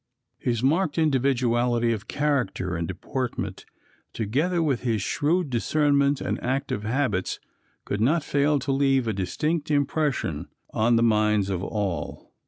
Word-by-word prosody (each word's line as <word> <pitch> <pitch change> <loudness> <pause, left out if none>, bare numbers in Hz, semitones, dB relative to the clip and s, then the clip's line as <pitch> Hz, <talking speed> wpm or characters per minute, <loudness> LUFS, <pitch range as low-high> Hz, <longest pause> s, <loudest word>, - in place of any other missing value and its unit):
His 120 -2 -1
marked 155 +3 +2
individuality 125 -5 +2
of 105 -2 -6
character 125 -11 -1
and 85 0 -2
deportment, 125 +7 -4 0.5
together 150 - 0
with 140 -6 0
his 115 -5 0
shrewd 155 - 0
discernment 140 +2 +2
and - - -3
active 130 -4 -1
habits, 110 -4 -1 0.5
could 100 - -2
not 150 +7 +3
fail 145 +1 +2
to 140 +1 -2
leave 135 -2 +2
a 110 - 0
distinct 150 - -2
impression 145 - 0 0.2
on 115 +2 +2
the 115 - +3
minds 105 -3 +2
of 95 -1 -2
all. 100 -8 -4
130 Hz, 135 wpm, -25 LUFS, 110-145 Hz, 0.5 s, not